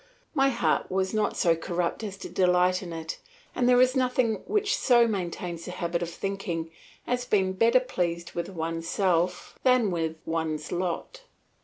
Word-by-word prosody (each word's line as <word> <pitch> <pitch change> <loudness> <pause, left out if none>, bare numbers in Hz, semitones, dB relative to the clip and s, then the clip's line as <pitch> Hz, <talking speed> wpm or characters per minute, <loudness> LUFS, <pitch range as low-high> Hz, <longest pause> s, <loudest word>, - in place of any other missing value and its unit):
My 275 -3 +4
heart 240 -3 0
was 190 +1 0
not 215 -1 0
so 170 -2 +3
corrupt 170 +4 -2
as 200 -2 -5
to - - -7
delight 180 0 +3
in 180 -3 -7
it, 160 -1 -5 0.3
and 245 0 +2
there 245 0 +6
is 255 +1 +4
nothing 250 -4 +1
which 420 0 +1
so 240 -2 +4
maintains 175 -4 -4
the - - -6
habit 170 -1 -2
of 170 - -2
thinking 170 -3 -4 0.3
as 245 0 -1
being 190 -5 +1
better 230 +6 +4
pleased 175 -9 -2
with 170 - -4
oneself 170 +1 -1
than 250 -6 +3
with 165 -2 -1
one's 160 -2 -2
lot. 180 - -3
185 Hz, 165 wpm, -27 LUFS, 170-235 Hz, 0.3 s, there